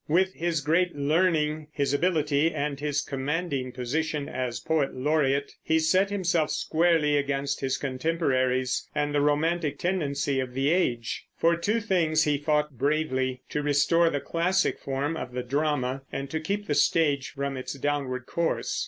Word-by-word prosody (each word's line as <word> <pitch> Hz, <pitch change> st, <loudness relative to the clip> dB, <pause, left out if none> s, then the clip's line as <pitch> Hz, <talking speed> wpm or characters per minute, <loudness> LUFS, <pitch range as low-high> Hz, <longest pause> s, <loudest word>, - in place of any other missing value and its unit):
With 185 Hz, +4 st, +2 dB
his 165 Hz, -2 st, -1 dB
great 170 Hz, +5 st, +1 dB
learning, 155 Hz, 0 st, +1 dB
his 140 Hz, -2 st, -1 dB
ability, 155 Hz, -1 st, +2 dB
and 145 Hz, -2 st, -3 dB
his 145 Hz, -1 st, -1 dB
commanding 140 Hz, -1 st, -2 dB
position 145 Hz, +4 st, -2 dB
as 125 Hz, -2 st, -3 dB
poet 155 Hz, -4 st, 0 dB
laureate, 140 Hz, 0 st, +1 dB
he 160 Hz, -, +1 dB
set 185 Hz, +5 st, +3 dB
himself 175 Hz, -6 st, +1 dB
squarely 160 Hz, -3 st, +2 dB
against 140 Hz, 0 st, -1 dB
his 135 Hz, -1 st, 0 dB
contemporaries 130 Hz, -3 st, 0 dB
and 145 Hz, -1 st, 0 dB
the 145 Hz, -, +2 dB
romantic 150 Hz, +1 st, +1 dB
tendency 145 Hz, -6 st, -1 dB
of 125 Hz, -1 st, -4 dB
the 135 Hz, +3 st, +2 dB
age. 120 Hz, -11 st, 0 dB
For 170 Hz, +1 st, +3 dB
two 205 Hz, +7 st, 0 dB
things 170 Hz, -8 st, +2 dB
he 145 Hz, -2 st, +1 dB
fought 150 Hz, -3 st, 0 dB
bravely, 130 Hz, -4 st, 0 dB
to 150 Hz, -, -1 dB
restore 150 Hz, +4 st, +3 dB
the 145 Hz, -, -1 dB
classic 180 Hz, +5 st, 0 dB
form 140 Hz, +4 st, -2 dB
of 125 Hz, -6 st, -6 dB
the 125 Hz, 0 st, -3 dB
drama, 135 Hz, -1 st, -1 dB
and 135 Hz, 0 st, -5 dB
to 160 Hz, -, -1 dB
keep 200 Hz, +6 st, -3 dB
the 150 Hz, -, -1 dB
stage 145 Hz, -2 st, +2 dB
from 140 Hz, -1 st, -4 dB
its 130 Hz, 0 st, -5 dB
downward 140 Hz, -3 st, -2 dB
course. 170 Hz, +4 st, -1 dB
150 Hz, 160 wpm, -27 LUFS, 135-165 Hz, -, set